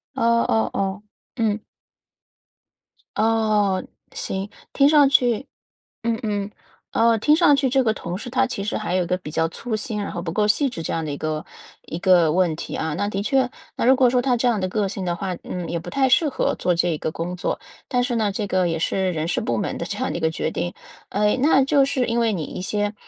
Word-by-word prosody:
哦 - - -3 0.3
哦 110 0 +2
哦， 195 +1 -2 0.3
嗯。 220 -3 0 1.5
哦， 215 -4 +2 0.3
行。 195 +1 -3 0.2
听 280 +1 +5
上 295 -2 +6
去 250 -1 +2 0.6
嗯 230 0 0
嗯。 205 -2 -2 0.4
呃， 230 0 +3
听 300 +8 +4
上 330 -3 +5
去 275 -1 +2
这 265 0 +2
个 220 - +3
同 175 -4 -5
事 245 +5 -7
他 260 +1 +2
其 200 - -4
实 210 - -2
还 210 -4 -3
有 185 -1 +2
一 - - -6
个 180 - 0
比 165 -5 -8
较 165 +1 +1
粗 225 +5 -4
心 215 0 -3
然 - - -4
后 175 - -5
不 165 -2 -4
够 210 +3 +1
细 275 +5 +2
致 165 - -6
这 - - -4
样 165 - -1
的 150 - -3
一 140 - -5
个 155 -1 -3 0.4
一 165 - -6
个 175 -4 +4
问 170 -2 +2
题 - - -6
啊。 160 -1 -2
那 205 +5 -1
的 195 -1 -2
确， 260 +2 +2 0.3
那 - - -1
如 260 - +6
果 255 -1 +4
说 245 0 +2
他 255 -1 +2
这 245 +1 +2
样 230 - +1
的 185 - -1
个 210 -1 0
性 190 -1 -5
的 175 -1 0
话， 185 +1 -4
嗯， 180 -2 -5
也 170 - -2
不 165 - -8
太 270 -1 +2
适 300 +4 +4
合 - - 0
做 180 - +1
这 170 -1 +1
个 155 +1 -3
工 175 +2 -4
作。 - - -2 0.3
但 245 -1 +1
是 245 -1 -1
呢， 215 -3 +1
这 205 +1 -2
个 185 -2 +1
也 165 - -1
是 185 +2 0
人 155 0 -2
事 - - 0
部 120 -1 -1
门 - - -2
的 - - -3
这 - - -5
样 - - -1
的 - - -3
一 - - -4
个 160 - +1
决 160 - -2
定。 175 +2 -3 0.4
呃， 210 +1 +2
那 275 -2 +5
就 275 +1 +4
是 260 -2 0
因 235 0 0
为 230 -1 +2
你 180 -6 -2
一 180 - -6
些 205 +1 -1
205 Hz, 260 characters per minute, -22 LUFS, 175-245 Hz, 1.5 s, 上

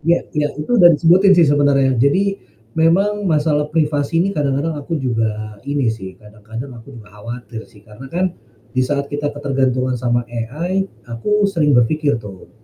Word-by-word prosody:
Iya 170 +2 +1
iya. 150 -1 0
Itu 190 +11 0
udah 175 - +9
disebutin 180 +5 +5
sih 170 - +6
sebenarnya, 140 -2 +3
jadi 195 +9 +1 0.3
memang 195 - +2
masalah 150 -2 +1
privasi 150 0 0
ini 195 - 0
kadang-kadang 145 -1 -1
aku 145 +3 -4
juga 110 -5 -2
ini 140 -4 0
sih, 95 -4 -7
kadang 105 +1 -17
kadang 115 +5 -6
aku 135 +4 -14
juga 105 -2 -14
khawatir 120 0 -7
sih. 105 - -20
Karena 105 +6 -12
kan 180 +4 -1 0.4
di 130 - 0
saat 140 0 -2
kita 145 0 -2
ketergantungan 130 -3 0
sama 120 -1 +1
AI 155 +12 -2 0.2
aku 205 - 0
sering 160 -8 +2
berpikir 145 +3 +2
tuh, 100 -5 -11
145 Hz, 165 wpm, -18 LUFS, 120-165 Hz, 0.4 s, udah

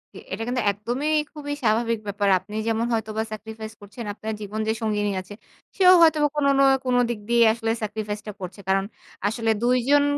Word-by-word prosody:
জি, - - -8
এটা 225 - -3
কিন্তু 250 0 0
একদমই 240 +9 -2 0.2
খুবই 290 -1 -5
স্বাভাবিক 225 +1 +2
ব্যাপার। 200 0 0
আপনি 210 +3 -11
যেমন 225 0 +1
হয়তো 220 -1 -1
বা 220 - +1
সেক্রিফাইস 220 +1 -7
করছেন 205 +4 -9
আপনার 220 +1 -5
জীবন 210 +1 -5
যে 220 - +2
সঙ্গিনী 210 -2 0
আছে 195 +2 -12 0.4
সেও 370 -1 +7
হয়তো 320 -1 +6
বা 295 - +5
কোনো 280 -1 +3
না - - +6 0.2
কোনো 250 -1 +2
দিক 230 -3 -3
দিয়েই 235 -1 +5
আসলে 225 -1 -2
স্যাক্রিফাইস 210 0 -3
টা - - -3
করছে। 185 +1 -7
কারণ, 195 0 +2 0.4
আসলে 225 +1 -1
২ 250 +1 +3
জন 290 0 +6
220 Hz, 200 wpm, -24 LUFS, 210-245 Hz, 0.4 s, সেও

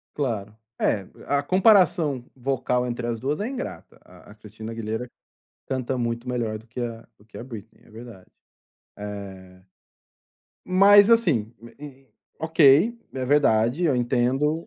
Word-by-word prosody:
Claro, 110 -7 -3 0.2
é 100 -3 0 0.2
a 140 0 +1
comparação 180 - +3
vocal 125 -1 -1
entre 120 0 -4
as 115 -1 -3
2 140 - -2
é 210 - -2
ingrata, 260 -1 -7
a - - -17
a - - -15
Cristina 110 +1 -10
Aguilera 115 +2 -4 0.6
canta 130 0 -2
muito 120 +1 -3
melhor 115 -3 -2
do 110 - -18
que 120 +2 -8
a 115 -1 -5
do 105 - -22
que 110 - -15
a - - -7
Britney, 115 -4 -11
é - - -21
verdade, 110 -4 -13 0.7
eh, 95 -3 -9 1.0
mas 200 +3 +6
assim, 155 - +2
m 115 0 -14
m 135 -2 -12 0.3
ok, 160 - +4
é 130 -1 -4
verdade, 130 +1 +2
eu 150 - +2
entendo 130 +6 0
125 Hz, 145 wpm, -24 LUFS, 110-150 Hz, 1.0 s, mas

